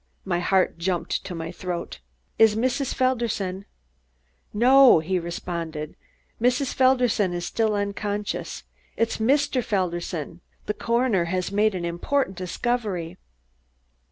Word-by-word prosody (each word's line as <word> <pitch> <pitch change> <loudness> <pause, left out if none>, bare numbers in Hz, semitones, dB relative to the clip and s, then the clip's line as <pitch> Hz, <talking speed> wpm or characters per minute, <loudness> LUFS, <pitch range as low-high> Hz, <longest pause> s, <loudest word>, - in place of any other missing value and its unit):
My 175 -3 0
heart 185 -1 +1
jumped 175 0 -1
to 180 - -5
my 165 0 -5
throat. 180 -1 -5 0.4
"Is 220 -1 +6
Mrs. 255 +4 0
Felderson 225 -7 -1 0.4
?" - - -43
"No," 255 +3 +7
he 180 +4 0
responded, 170 -2 -5 0.5
"Mrs. 250 +3 +1
Felderson 250 -7 +3
is 175 0 -3
still 220 -2 0
unconscious. 205 0 -3 0.3
It 230 0 +2
is - - -4
Mr. 275 +2 +2
Felderson. 175 -5 -3 0.2
The 210 - -1
coroner 235 -5 +1
has 185 +2 -2
made 210 0 +2
an 175 -2 -3
important 190 +6 -1
discovery." 185 -2 -3
195 Hz, 125 wpm, -24 LUFS, 175-235 Hz, 0.5 s, No